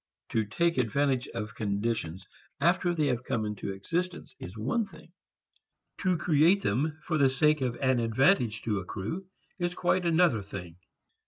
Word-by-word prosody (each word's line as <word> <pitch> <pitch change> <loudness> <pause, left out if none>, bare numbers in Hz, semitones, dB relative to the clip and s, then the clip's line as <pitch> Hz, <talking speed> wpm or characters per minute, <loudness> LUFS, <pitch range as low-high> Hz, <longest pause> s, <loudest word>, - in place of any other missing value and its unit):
To 110 -1 +1
take 170 +8 +1
advantage 130 +2 +1
of 105 -2 -5
conditions 100 -4 -2 0.3
after 175 +3 +2
they 155 -2 +1
have 125 -3 0
come 110 -3 -1
into 105 -1 -4
existence 165 - -3
is 90 +5 -8
one 135 - 0
thing; 175 -4 -13 0.9
to 185 -3 +1
create 165 +5 +4
them 145 +9 0
for 155 -3 0
the 135 -1 +5
sake 150 +2 +3
of 125 -2 0
an 130 -2 +2
advantage 115 - +2
to 105 -3 0
accrue 110 - -5 0.3
is 175 0 -1
quite 180 0 +1
another 165 - +3
thing. 90 -4 -8
130 Hz, 155 wpm, -29 LUFS, 110-170 Hz, 0.9 s, the